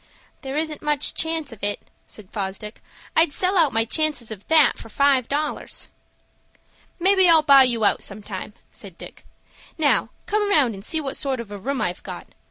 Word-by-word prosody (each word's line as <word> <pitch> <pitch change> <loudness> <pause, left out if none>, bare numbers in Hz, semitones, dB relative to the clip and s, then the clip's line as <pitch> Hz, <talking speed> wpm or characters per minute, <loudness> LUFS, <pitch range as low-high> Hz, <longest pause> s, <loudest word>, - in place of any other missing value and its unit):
"There 270 +1 -5
isn't 310 -1 -3
much 295 -1 +1
chance 320 -3 -1
of 220 -3 -13
it," 205 0 -1 0.3
said 205 -4 -10
Fosdick. 200 +1 -5 0.3
"I'd 320 -2 +4
sell 370 +5 0
out 325 -6 +4
my 225 0 +1
chances 280 -4 0
of 205 -2 -10
that 315 -2 +4
for - - -11
five 275 0 +2
dollars." 295 +2 -3 1.1
"Maybe 380 0 +4
I'll 320 -2 +6
buy 275 -2 +7
you 235 -4 0
out - - +2
sometime," 205 0 -5 0.2
said 190 -5 -10
Dick. - - -12 0.5
"Now, 305 -3 +2 0.2
come 415 -1 0
round 280 - +3
and 195 -1 -10
see 320 +8 -1
what 275 -2 -3
sort 270 -3 -1
of 230 -3 -8
a 205 - -7
room 270 +6 -3
I've - - -3
got. - - -8
275 Hz, 180 wpm, -22 LUFS, 220-315 Hz, 1.1 s, buy